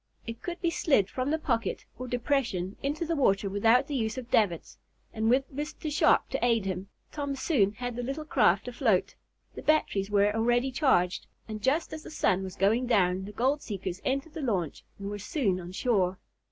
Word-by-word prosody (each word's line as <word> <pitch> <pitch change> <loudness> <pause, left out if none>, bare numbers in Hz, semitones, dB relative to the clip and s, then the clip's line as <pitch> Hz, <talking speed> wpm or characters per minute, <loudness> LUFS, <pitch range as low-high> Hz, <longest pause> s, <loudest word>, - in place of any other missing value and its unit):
It 230 -1 -7
could 350 0 -5
be 340 - +1
slid 270 - +2
from 255 +1 -2
the 315 - +1
pocket, 235 -7 -2
or 255 - -5
depression, 235 -7 -1
into 295 +4 -2
the 330 +1 -1
water 200 -8 +2
without 225 +6 +4
the 290 - -6
use 220 -3 -1
of 250 -1 -7
davits, 180 -7 +1 0.3
and, 220 0 0
with 265 +3 +2
Mr. 300 +2 -4
Sharp 295 - +4
to - - -2
aid 230 -4 +2
him, 190 0 -4 0.2
Tom 285 -2 -3
soon 250 - +2
had 245 +2 -5
the 245 - -3
little 275 +5 -4
craft 200 - +3
afloat. 240 -6 +1 0.4
The - - -8
batteries 205 -10 +1
were 205 0 +3
already 240 +3 +2
charged, 250 - +2 0.2
and 215 -1 -6
just 295 +9 +1
as 315 - -6
the - - -10
sun 190 -10 +1
was 190 0 -6
going 220 +7 +2
down 190 -5 +2
the 205 - -7
gold 265 +7 +1
seekers 190 -3 -5
entered 275 +4 -2
the 320 - -5
launch 190 - -2
and 200 - -6
were 205 0 -4
soon 205 - 0
on 175 0 -8
shore. 190 -4 +1
235 Hz, 200 wpm, -28 LUFS, 195-275 Hz, 0.4 s, without